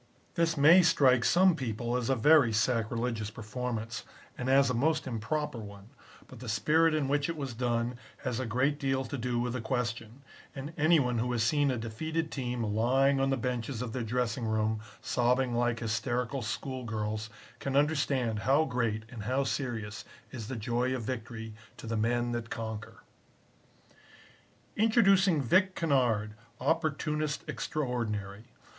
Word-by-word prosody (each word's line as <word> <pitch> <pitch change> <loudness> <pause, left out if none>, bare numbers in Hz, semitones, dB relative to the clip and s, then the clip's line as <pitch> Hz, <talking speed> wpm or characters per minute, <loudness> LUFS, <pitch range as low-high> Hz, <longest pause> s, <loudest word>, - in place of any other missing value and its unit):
This 165 -2 +1
may 160 +6 +8
strike 130 -7 +4
some 180 +9 +5
people 120 -3 -3
as 125 -1 -1
a 135 - +3
very 140 0 +5
sacrilegious 115 0 0
performance 110 0 -5 0.3
and 125 +1 -3
as 135 +1 +5
a 125 - 0
most 155 +6 +1
improper 130 +3 -3
one, 100 -1 -10 0.4
but 130 - -12
the 120 -1 -7
spirit 155 +9 +3
in 150 -3 0
which 145 +1 +1
it 165 - -3
was 135 -4 -4
done 120 0 -1 0.2
has 125 -2 -2
a 130 - -2
great 135 +6 +1
deal 135 -1 0
to 145 - -5
do 125 -1 -1
with 120 0 -1
the 125 - -3
question, 120 0 -3 0.3
and 140 +3 -6
any 160 +2 +4
one 125 -3 0
who 125 +2 -1
has 115 -2 +1
seen 145 +4 +2
a 130 - 0
defeated 155 +9 -3
team 125 -3 -3
lying 130 +6 +2
on 135 0 +2
the 135 - +1
benches 125 0 -3
of 115 -3 -5
their 130 - -2
dressing 120 +1 -1
room, 110 0 0 0.2
sobbing 120 +3 +1
like 120 -1 0
hysterical 120 +3 -1
school 130 +4 -4
girls, 110 -1 -3 0.3
can 135 -1 -3
understand 140 -6 +1
how 140 +7 +3
great 115 -5 -1
and 115 -3 -8
how 130 +4 +1
serious 110 -6 -3 0.3
is 115 -5 -6
the 130 - -4
joy 120 +3 -1
of 125 - -4
victory 115 -2 -5 0.2
to - - -10
the 115 0 -2
men 120 +2 0
that 120 -1 -4
conquer." 110 -1 -6 1.7
Introducing 195 - +4
Vic 185 - +3
Kennard, 120 -9 +1 0.3
opportunist 150 -1 -1
extraordinary. 110 -7 -3
125 Hz, 160 wpm, -30 LUFS, 115-140 Hz, 1.7 s, may